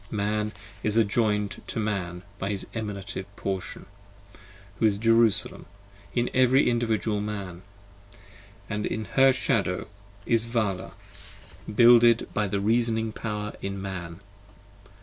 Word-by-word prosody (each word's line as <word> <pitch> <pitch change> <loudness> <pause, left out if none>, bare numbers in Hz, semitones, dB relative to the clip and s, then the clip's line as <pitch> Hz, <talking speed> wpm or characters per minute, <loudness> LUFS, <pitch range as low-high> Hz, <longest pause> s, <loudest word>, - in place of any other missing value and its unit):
Man 105 0 -1 0.3
is 105 +1 +1
adjoin'd 105 -2 +1
to - - -3
Man 95 -5 -3 0.2
by 95 - -2
his 100 -2 -2
Emanative 100 -3 -5
portion, 95 -3 -4 0.9
Who 110 - +5
is 100 -2 +1
Jerusalem 115 -1 +2 0.5
in 120 0 +2
every 130 +1 +4
individual 115 -3 0
Man: 100 -4 -5 1.1
and 105 -1 -2
her 110 +5 +1
40 - - +7
Shadow 130 - 0 0.4
is 115 -1 +2
Vala, 110 -5 -2 0.8
builded 120 0 +6
by 105 -1 0
the 100 +1 -1
Reasoning 110 +1 +1
power 105 -1 -4
in 100 0 -4
Man. 90 -2 -6
105 Hz, 115 wpm, -26 LUFS, 100-115 Hz, 1.1 s, 40